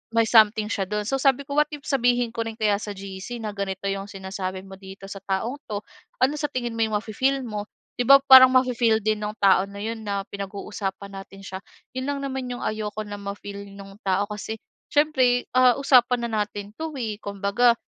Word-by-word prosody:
may 230 Hz, 0 st, +4 dB
something 215 Hz, -2 st, +5 dB
siya 195 Hz, -3 st, -1 dB
do'n. 210 Hz, +1 st, -2 dB
So 270 Hz, -, +1 dB
sabi 270 Hz, -1 st, +3 dB
ko, 280 Hz, +1 st, -5 dB
what 300 Hz, -, +5 dB
if 295 Hz, -, -6 dB
sabihin 245 Hz, -3 st, +2 dB
ko 230 Hz, -, -3 dB
rin 225 Hz, -, -5 dB
kaya 210 Hz, -2 st, +2 dB
sa 210 Hz, -, -5 dB
GC 195 Hz, +4 st, -7 dB
na 215 Hz, -, -2 dB
ganito 195 Hz, -1 st, -4 dB
'yong 195 Hz, 0 st, -3 dB
sinasabi 190 Hz, -1 st, -5 dB
mo 195 Hz, 0 st, -10 dB
dito 195 Hz, 0 st, -11 dB
sa 200 Hz, -, -6 dB
taong 200 Hz, +8 st, -2 dB
'to, 205 Hz, -1 st, -3 dB, 0.4 s
ano 265 Hz, +3 st, +4 dB
sa 295 Hz, -, -1 dB
tingin 240 Hz, -3 st, -3 dB
mo -, -, 0 dB
'yong 220 Hz, -, -5 dB
mafi-feel 260 Hz, +6 st, 0 dB
mo? 210 Hz, -3 st, -4 dB, 0.3 s
'Di 245 Hz, -, +1 dB
ba 275 Hz, 0 st, +9 dB
parang 260 Hz, -1 st, +11 dB
mafi-feel 245 Hz, -3 st, +3 dB
din 215 Hz, 0 st, 0 dB
nung 210 Hz, -, -3 dB
tao 195 Hz, -1 st, +5 dB
na 200 Hz, 0 st, -10 dB
'yon 225 Hz, 0 st, -4 dB
na 200 Hz, -1 st, -1 dB
pinag-uusapan 200 Hz, 0 st, -5 dB
natin 195 Hz, 0 st, -14 dB
siya. 190 Hz, 0 st, -6 dB, 0.4 s
'Yon 260 Hz, -, -2 dB
lang 285 Hz, -1 st, -2 dB
naman 265 Hz, -1 st, -3 dB
'yong 245 Hz, -, -5 dB
ayoko 215 Hz, -1 st, -3 dB
na 205 Hz, 0 st, -7 dB
ma-feel 200 Hz, 0 st, -7 dB
nung 195 Hz, 0 st, -11 dB
tao 195 Hz, +1 st, +2 dB
kasi 210 Hz, +1 st, -5 dB, 0.4 s
siyempre, 260 Hz, -5 st, +3 dB
ah, 255 Hz, -1 st, +7 dB
usapan 250 Hz, -3 st, +4 dB
na 215 Hz, -2 st, +1 dB
natin 205 Hz, -1 st, -8 dB
'to, 320 Hz, -1 st, -4 dB
eh. 220 Hz, -4 st, -3 dB
Kumbaga, 200 Hz, +4 st, +2 dB
215 Hz, 210 wpm, -24 LUFS, 200-245 Hz, 0.4 s, parang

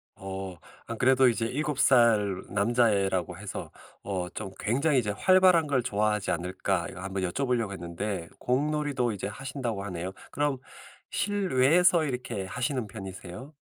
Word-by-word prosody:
어. 95 Hz, -1 st, -6 dB, 0.3 s
안 115 Hz, -, -5 dB
그래도 130 Hz, +1 st, +5 dB
이제 115 Hz, -1 st, -1 dB
7 145 Hz, +3 st, -2 dB
살 110 Hz, -8 st, +4 dB
남자애라고 100 Hz, -4 st, +1 dB
해서 -, -, -6 dB, 0.3 s
어 95 Hz, -3 st, -2 dB
'좀 95 Hz, -, -6 dB
굉장히 140 Hz, +5 st, +2 dB
이제 105 Hz, -4 st, -1 dB
활발한 185 Hz, -, +5 dB
걸 135 Hz, -4 st, +1 dB
좋아하지 105 Hz, -3 st, 0 dB
않을까?' 90 Hz, 0 st, -1 dB
이거 90 Hz, -, -9 dB
한번 95 Hz, 0 st, -3 dB
여쭤보려고 115 Hz, +3 st, 0 dB
했는데 90 Hz, 0 st, -4 dB
공놀이도 140 Hz, -1 st, 0 dB
이제 100 Hz, -, -4 dB
하신다고 120 Hz, -1 st, -4 dB
하네요. 90 Hz, -1 st, -4 dB, 0.2 s
그럼 145 Hz, -2 st, 0 dB, 0.5 s
실외에서 180 Hz, -3 st, +3 dB
이렇게 125 Hz, -7 st, -3 dB
하시는 125 Hz, +4 st, -2 dB
편이세요? 95 Hz, -, -9 dB
115 Hz, 325 characters per minute, -28 LUFS, 95-135 Hz, 0.5 s, 그래도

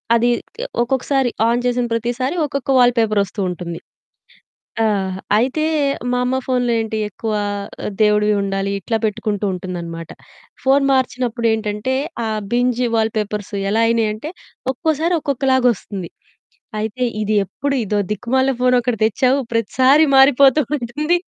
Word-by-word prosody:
అది 240 Hz, +1 st, +3 dB
ఇట్లా 470 Hz, +3 st, -9 dB, 0.2 s
ఒక్కొక్కసారి 265 Hz, +1 st, +1 dB, 0.2 s
ఆన్ 240 Hz, +1 st, +1 dB
చేసిన 245 Hz, 0 st, +1 dB
ప్రతిసారి 245 Hz, +6 st, -1 dB
ఒక్కొక్క 280 Hz, -1 st, -3 dB
వాల్‌పేపర్ 230 Hz, -4 st, +3 dB
ఒస్తూ 200 Hz, +2 st, -9 dB
ఉంటుంది. 170 Hz, -1 st, -5 dB, 1.1 s
ఆ! -, -, +4 dB, 0.5 s
అయితే, 265 Hz, +6 st, 0 dB, 0.5 s
మా 250 Hz, -, +1 dB
అమ్మ 260 Hz, +1 st, 0 dB
ఫోన్‌లో 245 Hz, -2 st, +1 dB
ఏంటి 220 Hz, 0 st, -3 dB
ఎక్కువ 220 Hz, +2 st, -4 dB, 0.5 s
ఆ! -, -, -1 dB
దేవుడివి 210 Hz, 0 st, +3 dB
ఉండాలి 195 Hz, 0 st, -2 dB
ఇట్లా 225 Hz, +4 st, -1 dB
పెట్టుకుంటూ 210 Hz, -1 st, -2 dB
ఉంటుందనమాట. 170 Hz, -2 st, -6 dB, 0.6 s
ఫోన్ 275 Hz, +1 st, +4 dB
మార్చినప్పుడేంటంటే, 235 Hz, -3 st, 0 dB, 0.3 s
ఆ -, -, -1 dB, 0.2 s
బింజ్ 245 Hz, 0 st, +1 dB
వాల్‌పేపర్స్ 210 Hz, -2 st, -2 dB, 0.2 s
ఎలా 225 Hz, +2 st, +2 dB
అయినయంటే 225 Hz, +5 st, -1 dB, 0.4 s
ఒక్కోసారి 320 Hz, +4 st, 0 dB
ఒక్కొక్కలాగొస్తుంది. 250 Hz, -, 0 dB, 0.7 s
అయితే, 220 Hz, +4 st, -3 dB, 0.2 s
"ఇదెప్పుడు 215 Hz, +7 st, -1 dB
ఇదో 210 Hz, +1 st, -1 dB
దిక్కుమాలిన 260 Hz, +5 st, +1 dB
ఫోనొకటి 250 Hz, -2 st, +2 dB
తెచ్చావు 255 Hz, +5 st, +2 dB
ప్రతిసారి 260 Hz, +7 st, +4 dB
మారిపోతూ 270 Hz, +1 st, +6 dB, 0.2 s
ఉంటుంది." 295 Hz, +8 st, 0 dB
240 Hz, 115 wpm, -19 LUFS, 210-260 Hz, 1.1 s, మారిపోతూ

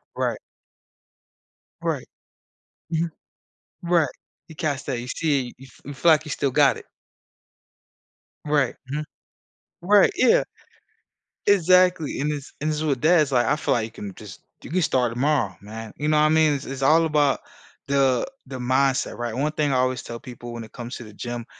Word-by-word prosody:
Right. -, -, -1 dB, 1.4 s
Right. -, -, -2 dB, 0.9 s
Mhm. 165 Hz, +1 st, +1 dB, 0.8 s
Right. 170 Hz, -5 st, +2 dB, 0.4 s
You 160 Hz, -, -12 dB
cast 145 Hz, -4 st, -2 dB
that, 125 Hz, -3 st, -1 dB
you 125 Hz, -, -7 dB
see 140 Hz, -4 st, -1 dB
you 135 Hz, -, -13 dB
f -, -, -21 dB
You 145 Hz, -, -6 dB
feel 165 Hz, +4 st, +4 dB
like 155 Hz, 0 st, +3 dB
you 150 Hz, -, -6 dB
still 140 Hz, -, 0 dB
got 140 Hz, +1 st, +4 dB
it. -, -, -12 dB, 1.6 s
Right, 145 Hz, -4 st, +1 dB, 0.2 s
mhm. 150 Hz, +2 st, -2 dB, 0.8 s
Right, 200 Hz, +2 st, +5 dB
yeah. 255 Hz, -, +4 dB, 1.0 s
Exactly, 180 Hz, -5 st, +4 dB
and 150 Hz, +2 st, 0 dB
this 145 Hz, -2 st, -6 dB
and 155 Hz, +2 st, -1 dB
this 155 Hz, -, -1 dB
is 155 Hz, -, -2 dB
what 140 Hz, -4 st, 0 dB
dad's 155 Hz, -2 st, +4 dB
like, 120 Hz, -2 st, +3 dB
I -, -, +2 dB
feel -, -, 0 dB
like 110 Hz, -2 st, 0 dB
you 115 Hz, -, -10 dB
can 105 Hz, -3 st, -8 dB
just -, -, -11 dB, 0.2 s
you -, -, -9 dB
can 180 Hz, +3 st, +1 dB
start 125 Hz, -6 st, +1 dB
tomorrow, 125 Hz, -6 st, +1 dB
man, 110 Hz, +1 st, -8 dB
you 150 Hz, -, -2 dB
know 155 Hz, -, +3 dB
what 150 Hz, -, +5 dB
I 155 Hz, -, +4 dB
mean? 155 Hz, -1 st, +4 dB
It's 140 Hz, -1 st, -4 dB
it's 135 Hz, 0 st, -6 dB
all 160 Hz, +4 st, +5 dB
about 145 Hz, -3 st, +2 dB, 0.5 s
the 135 Hz, -2 st, +2 dB, 0.2 s
the 130 Hz, -1 st, -6 dB
mindset. 130 Hz, +1 st, +1 dB
Right? 120 Hz, -2 st, -3 dB
One 145 Hz, +5 st, 0 dB
thing 150 Hz, -2 st, 0 dB
I 130 Hz, -, +2 dB
always 130 Hz, -1 st, 0 dB
tell 115 Hz, 0 st, -7 dB
people 120 Hz, -1 st, -9 dB
when 115 Hz, -1 st, -6 dB
it 110 Hz, -, -18 dB
comes 120 Hz, 0 st, -7 dB
to -, -, -9 dB
the 105 Hz, -, -13 dB
gym, 120 Hz, +2 st, -5 dB
140 Hz, 185 wpm, -24 LUFS, 125-155 Hz, 1.6 s, Right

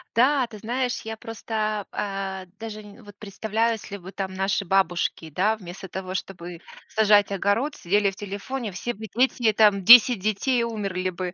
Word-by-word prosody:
Да, 260 Hz, +1 st, +3 dB
ты 215 Hz, -3 st, -11 dB
знаешь, 245 Hz, +3 st, -2 dB
я 220 Hz, 0 st, -6 dB
просто, 215 Hz, -2 st, -3 dB
а, 195 Hz, -2 st, -4 dB
даже 220 Hz, -1 st, -7 dB
н 210 Hz, +3 st, -15 dB
вот 205 Hz, -1 st, -14 dB
представляю, 220 Hz, +3 st, -1 dB
если 200 Hz, -2 st, -7 dB
бы 190 Hz, +1 st, -11 dB
там 190 Hz, -1 st, -4 dB
наши 195 Hz, +2 st, 0 dB
бабушки, 175 Hz, -3 st, 0 dB
да 210 Hz, +8 st, +1 dB
вместо 190 Hz, 0 st, -10 dB
того, 185 Hz, +1 st, -6 dB
чтоб 190 Hz, -2 st, -5 dB, 0.5 s
сажать 205 Hz, -2 st, +3 dB
огород, 205 Hz, +10 st, 0 dB
сидели 200 Hz, +2 st, +1 dB
в -, -, -15 dB
телефоне, 205 Hz, +4 st, -5 dB
все 240 Hz, +6 st, -4 dB
бы 220 Hz, +2 st, -9 dB
дети 245 Hz, -2 st, +2 dB
там, 210 Hz, -2 st, +4 dB
10 240 Hz, 0 st, +9 dB
детей, 215 Hz, +5 st, 0 dB
и -, -, +1 dB
умерли 195 Hz, -5 st, -2 dB
бы 180 Hz, 0 st, -5 dB
205 Hz, 175 wpm, -24 LUFS, 195-225 Hz, 0.5 s, 10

